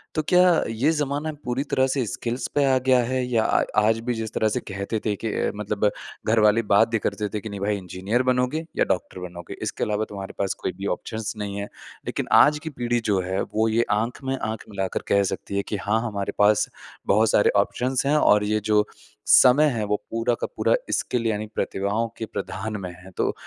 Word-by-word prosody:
तो 155 - +2
क्या 180 0 +6 0.3
ये 115 +7 +1
ज़माना 145 0 -1
पूरी 125 +2 -1
तरह 130 0 +3
से 130 -2 0
स्किल्स 120 +5 -3
पे 145 - +4
आ 135 -1 +4
गया 130 -1 +5
है? 130 +1 -1
या 120 -3 +1
आ - - +2 0.2
आज 110 +1 +2
भी 125 - +2
जिस 110 -2 -5
तरह 110 - +1
से - - -1
कहते 100 +3 -4
थे 105 -2 +1
कि 110 +3 -4
अ, - - 0
मतलब 105 0 0 0.4
घर 110 +1 +4
वाले 105 +1 +4
बात 110 +3 +6
भी 115 -1 0
करते 105 0 -2
थे 105 - -1
कि, 110 - -6
"नहीं, 100 -1 -6
भई 100 +1 0
इंजीनियर 95 +6 -2
बनोगे 130 +5 0
या - - +3
डॉक्टर 90 0 -2
बनोगे। 90 -1 -8
इसके - - -2
अलावा 105 +1 0
तुम्हारे 100 -1 -7
पास 100 - 0
कोई - - 0
भी 100 - -5
ऑप्शंस 110 -1 -5
नहीं 100 -1 -4
है।" 100 - -5 0.4
लेकिन - - -3
आज 150 0 +4
की 160 - -4
पीढ़ी 120 -4 -1
जो 95 - +3
है, 95 +1 -2
वो 110 +1 0
ये 115 +2 +2
आँख 115 +6 -1
में 135 0 -1
आँख 110 -1 -4
मिलाकर 95 -2 -3
कह 100 0 +3
सकती 100 - -6
है 100 - 0
कि, 105 - -1
"हाँ, 105 +3 0
हमारे 100 -3 -3
पास 105 0 +4 0.4
बहुत 110 +2 +4
सारे 105 - +4
ऑप्शंस 125 +5 -2
हैं 145 +2 +3
और 105 -8 +4
ये 105 +1 +1
जो 105 0 +4 0.4
समय 135 +4 +7
है, 115 -4 -2
वो 105 0 +1 0.2
पूरा 115 +1 +1
का - - 0
पूरा - - +3 0.2
स्किल 120 -2 0
यानी 110 -1 -1
प्रतिभाओं 100 +4 -1
के 110 - -3
प्रधान 110 0 -4
में 90 - -5
है।" 95 - -12
तो - - +1
110 Hz, 220 wpm, -24 LUFS, 100-125 Hz, 0.4 s, समय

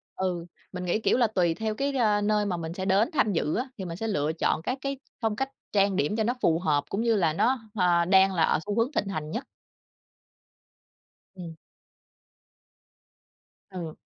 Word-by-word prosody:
ừ, 180 -3 -2 0.3
mình 180 -1 -5
nghĩ, 180 +5 +1
kiểu 230 - +2
là, 240 -3 +4
tùy 180 -6 +1
theo 220 +3 -3
cái, 280 +3 -1
a, 210 -4 +2
nơi 210 0 +1
mà 180 -3 -1
mình 165 0 -5
sẽ 185 +1 -4
đến 200 +7 +3
tham 215 -8 +2
dự 155 -3 0
á, 255 +3 -2
thì 190 - -5
mình 170 0 -6
sẽ 225 - -3
lựa 150 -7 0
chọn 160 -1 0
các 250 +10 -2
cái 275 -1 -3 0.2
phong 220 -2 0
cách 270 +4 -2 0.2
trang 200 -1 +3
điểm 150 +6 0
cho 220 - +1
nó 240 - +1
phù 165 0 +3
hợp 150 -5 +1
cũng 200 - -1
như 230 -1 +2
là 170 -6 +2
nó, 250 +9 +2 0.2
hờ, 175 -3 +3
đang 190 +1 +5
là 165 -3 +2
ở - - +2
xu 210 +2 -3
hướng 235 +5 +1
thịnh 205 - -1
hành 155 -5 -4
nhất. 240 +9 -4 1.9
Ừm. 170 -4 -8 2.1
Ừ. 175 -5 -6
195 Hz, 200 wpm, -27 LUFS, 170-220 Hz, 2.1 s, đang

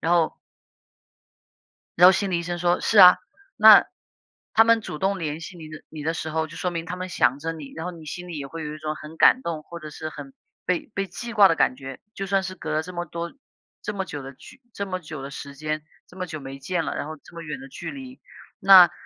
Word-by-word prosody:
然 165 +2 +1
后 170 -2 +3 1.6
然 180 +1 +9
后 - - +9
心 195 +1 0
理 175 - +1
医 170 - -5
生 175 0 -4
说： 175 0 +2
“是 215 - +3
啊， 180 -1 +10 0.4
那 - - +9 0.7
他 225 - +7
们 230 0 +4
主 150 - -7
动 195 +1 +1
联 155 -2 -4
系 175 +1 -9
你 160 - -9
的 155 0 -10
你 155 -2 -8
的 160 +2 0
时 160 -1 -4
候， 160 0 -1
就 160 - -12
说 180 - -2
明 165 -1 -4
他 180 - -5
们 185 0 -6
想 135 -5 +2
着 165 +3 -3
你。 150 -4 -9
然 165 +1 -5
后 - - -4
你 165 -3 -12
心 180 +4 -7
里 170 -3 -6
也 140 - -5
会 165 +3 -7
有 150 0 -5
一 - - -9
种 155 0 -4
很 155 +1 -11
感 255 - +6
动， 165 -8 -4
或 170 +2 -9
者 155 -2 -8
是 155 +1 -7
很 145 -3 -10 0.3
被 180 +4 -1
被 195 -1 -2
记 235 +6 -7
挂 205 -3 +8
的 165 - +2
感 125 - +2
觉。 135 0 -9
就 195 -3 -5
算 195 0 +1
是 190 - -5
隔 160 -4 -6
了 155 +1 0
这 180 +1 -9
么 175 - -3
多 170 +5 -5 0.5
这 210 - -4
么 190 -1 -2
久 145 -3 -6
的 135 +1 -8
距 260 - -16
这 200 - -3
么 185 -1 -4
久 155 -4 -8
的 140 - -7
时 140 0 -8
间 155 +1 -3 0.3
这 - - -18
么 185 -1 -4
久 155 -1 -6
没 135 0 -9
见 165 +4 -2
了， - - -3
然 - - -4
后 155 - -7
这 - - -17
么 170 - -8
远 165 +10 -6
的 270 - -10
距 265 - -7
离。 260 -2 -9 0.4
那 185 -4 +9
170 Hz, 285 characters per minute, -24 LUFS, 155-185 Hz, 1.6 s, 啊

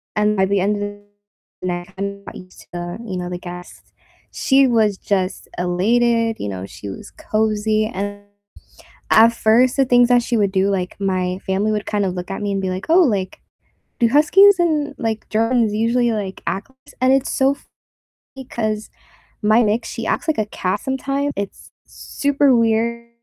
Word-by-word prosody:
and 210 0 +1
by 190 - +3
the 200 +1 +1
end 205 +2 0
of 205 - -2 0.7
night, 180 0 -4
kinda 200 0 -5
got - - -9
used 185 0 -13
to - - -19
the 175 0 -5
you 190 -4 -4
know, 180 0 -4
the 180 - -4
guests, 180 0 -11 0.4
she 270 +1 +4
was 220 -4 +2
just 190 -2 -2
elated, 225 +6 +1
you - - -4
know, 95 -1 -5
she 100 +1 -9
was 95 - -9
cozy, 215 0 0
and 205 +1 -4 0.9
at 230 +1 +7
first, 240 +4 +3
the 270 - +4
things 245 -1 +4
that 245 -1 +4
she 240 0 -1
would 200 -3 +1
do, 195 +1 +2
like 185 -2 -2
my 185 -2 -1
family 195 +3 0
would 210 0 -2
kinda 205 -2 0
look 180 0 -6
at 195 - -4
me 205 - -1
and 195 - -1
be 190 - -1
like, 185 +1 -5
"Oh, 355 +3 +6
like, 200 - -1 0.6
do 235 - +4
Huskies 365 +8 +6
and, 300 -4 +1
like, 225 -2 -3
Germans 225 0 +1
usually, 235 +2 +1
like, 200 -3 -4
act 195 +7 -3
like 265 - -28
this?" - - -18
and 260 +1 +4
it's 270 0 +1
so 270 +1 +2
funny - - -29 0.6
'cause 215 -2 -3 0.5
my 215 +3 +4
mix, 220 +2 0
she 230 -1 -5
acts - - -1
like 315 - +1
a 215 - +1
cat 190 -1 -2
sometimes, 275 +2 -2
it's 200 0 -6 0.2
super 285 -2 +1
weird 235 +1 0
215 Hz, 185 wpm, -20 LUFS, 190-240 Hz, 0.9 s, at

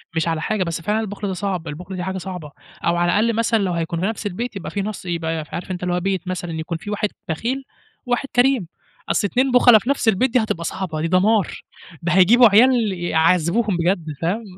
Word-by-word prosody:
مش 160 +1 0
على 165 -1 -1
حاجة، 210 0 0
بس 165 -1 -4
فعلًا 210 +4 0
البُخل 205 -1 -4
ده 190 - -2
صعب، 185 -3 -3
البُخل 180 +6 -7
ده 180 - -3
حاجة 190 0 -3
صعبة. 180 -6 -7 0.3
أو 170 0 +2
على 175 0 +2
الأقل 225 +4 +2
مثلًا 230 -1 +2
لو 185 -2 -1
هيكون 165 0 -2
في - - 0
نفس 220 0 -3
البيت 225 +5 -5
يبقى 195 - -6
فيه 200 - -2
نُص 210 -1 -5
يبقى 165 -2 -2
عارف 180 +2 -5
أنت 180 0 -5
اللي 180 0 0
هو 180 - +1
بيت 190 -1 -2
مثلًا 175 -2 -4
يكون 160 +1 -4
فيه 205 +5 -7
واحد 210 0 -1 0.2
بخيل 245 +12 -2 0.4
وواحد 245 +2 -1
كريم، 245 -7 +3 0.4
أصل 205 - +1
اتنين 255 +5 +1
بُخلا 245 -3 +7
في 235 - -6
نفس 280 -4 0
البيت 230 +4 +3
دي 255 - +5
هتبقى 215 -7 -2
صعبة، 160 -2 -4
دي 165 - 0
دمار. 195 +2 +2 0.4
ده 175 - -1
هيجيبوا 220 +6 +7
عيال 230 +1 +4
يعذّبوهم 175 +4 +1
بجد 175 0 0 0.2
فاهم؟ 200 +8 -1
190 Hz, 220 wpm, -21 LUFS, 170-220 Hz, 0.4 s, بُخلا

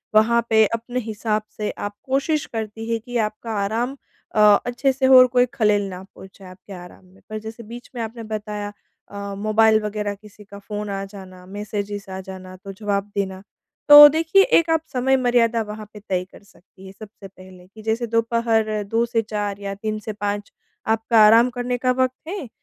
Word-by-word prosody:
वहाँ 235 +2 +4
पे 220 -1 +5
अपने 235 +2 -3
हिसाब 215 -1 -2 0.2
से 210 -1 -2
आप 205 0 -5
कोशिश 275 +3 0
करती 225 0 -6
हैं 230 - 0
कि 245 -1 -3
आपका 220 +1 -3
आराम 235 +7 -2 0.4
अ, - - +2 0.3
अच्छे 245 +3 0
से 265 0 -1
हो 260 0 +8
और 255 0 +8
कोई 250 -1 +4
खलल 210 -6 +2
ना 185 -1 -8
पहुँचाए 190 0 -14
आपके 195 +2 -13
आराम 180 0 -12
में। 185 +1 -22
पर 215 - -5
जैसे 220 +2 -9
बीच 235 +3 -11
में 240 - -3
आपने 230 +1 -6
बताया 210 -1 -5 0.4
अ, 200 0 -6
मोबाइल 215 +1 +3
वग़ैरह 210 -1 -3
किसी 210 +1 -16
का 200 0 -12
फ़ोन 210 0 -6
आ 195 0 -3
जाना, 190 -2 -12
मैसेजेज़ 205 0 -6
आ 190 - -5
जाना, 185 -1 -10
तो 195 +1 -10
जवाब 200 0 -3
देना। 190 -2 -3 0.5
तो 295 0 +12
देखिए, 325 +6 +3
एक 335 -3 +3
आप 325 -1 +2
समय 265 +1 +2
मर्यादा 240 -2 +2
वहाँ 210 0 -8
पे 210 - -10
तय 180 -1 0
कर - - -16
सकती 195 -1 -20
हैं 190 - -10
सबसे 215 -2 -11
पहले, 185 -1 -16
कि 215 +3 -15
जैसे 225 +2 -2
दोपहर 230 -2 0
2 225 +4 0
से 230 -1 0
4 205 -2 -4
या 200 -1 -5
3 215 +1 -4
से 215 +1 -6
5 205 0 -4 0.4
आपका 225 +1 +2
आराम 230 +3 +6
करने 245 0 -3
का 255 +1 +1
वक़्त 255 +3 -1
है। 360 -6 -5
215 Hz, 195 wpm, -22 LUFS, 200-235 Hz, 0.5 s, तो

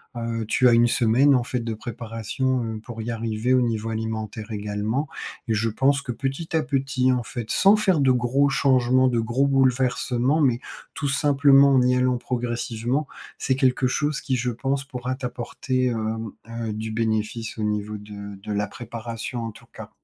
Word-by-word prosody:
heu, 115 -1 -3
tu 125 +3 +3
as 120 - +6
1 115 0 +5
semaine 125 +4 +4
en 125 - +3
fait 125 +1 -2
de 115 -1 -3
préparation, 115 +3 -3
heu, 110 -1 -4
pour 115 0 -8
y 120 - -3
arriver. 115 +2 -1
Au 130 - +4
niveau 115 -1 -2
alimentaire 110 0 -4
également 105 +7 -2 0.4
et - - +3
je 110 +1 +1
pense 135 +6 +2
que 125 -3 -4
petit 135 +7 -4
à 160 - +2
petit 135 -3 +1
en 125 -1 +1
fait 120 -1 -6
sans 200 +2 +6
faire 190 -6 +2
de 135 -2 +4
gros 125 +3 +2
changements, 130 -2 +3
de 120 -2 0
gros 120 +5 +1
bouleversements 130 0 +2
mais 125 -6 +3 0.3
tout 145 - -2
simplement 140 0 +5
en 130 - +5
y 125 0 +3
allant 125 0 +2
progressivement. 120 +2 -2 0.3
C'est 130 - 0
quelque 130 -1 +2
chose 145 +3 -1
qui 130 -2 -1
je 125 0 -1
pense 135 +4 -2
pourra 125 -1 -4
t'apporter, 130 0 -2
hem, 110 -2 -2 0.2
heu, 115 -1 -4
du 110 +1 -4
bénéfice 110 0 -2
au 110 - -3
niveau 105 0 -2
de 100 -1 -9
de 105 - -4
la 105 0 0
préparation 115 +2 -6
en 115 - -4
tout - - -16
cas. - - -9
120 Hz, 185 wpm, -24 LUFS, 110-135 Hz, 0.4 s, as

